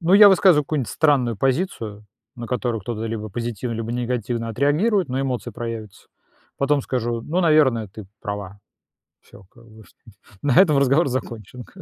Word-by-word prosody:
Ну, 175 +2 +1
я 205 0 +9
высказываю 185 -5 +5
какую-нибудь 140 -5 -2
странную 135 -8 +2
позицию, 115 - -2 0.3
на 120 -1 -7
которую 120 -2 -2
кто-то 110 +2 -5
либо 110 -1 -4
позитивно, 115 +1 -4
либо 115 0 -4
негативно 120 -1 -2
отреагирует, 150 - +1
но 130 +2 -2
эмоции 130 -3 -3
проявятся. 115 -3 -7 0.5
Потом 140 +1 +1
скажу: 120 -2 -2
"Ну, 170 +8 -1
наверное, 145 - +3
ты 105 0 -11
права". 100 -1 -6 0.6
Всё, - - -17
как 115 -1 -19
бы. 110 0 -16 0.6
На 135 -4 +1
этом 160 -7 +6
разговор 140 +3 +3
закончен 125 -2 -5
как 190 - -21
125 Hz, 155 wpm, -22 LUFS, 115-145 Hz, 0.6 s, я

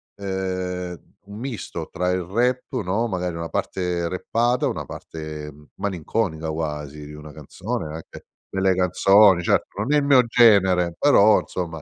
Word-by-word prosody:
ehm, 95 -3 -4
un 100 +2 -10
misto 125 -3 -5
tra 90 0 -1
il 90 0 0
rap, 120 +8 0 0.2
no, 100 +6 0
magari 90 -4 -3
una 85 0 -5
parte 90 -2 -2
rappata, 120 +7 0
una - - -4
parte 75 -1 -8
m 75 +1 -18
malinconica 90 -3 -2
quasi 75 -2 -5
di 75 - -10
una 75 0 -10
canzone, 75 +2 -5
anche 80 - -11 0.2
delle 95 -1 +1
canzoni 95 +1 +5
certo, 90 - 0
non 130 +7 0
è - - +5
i - - +3
mio 140 -3 +5
genere 95 -8 +4
però, 110 -7 +5
insomma, 80 -4 -5
90 Hz, 150 wpm, -23 LUFS, 80-105 Hz, 0.2 s, canzoni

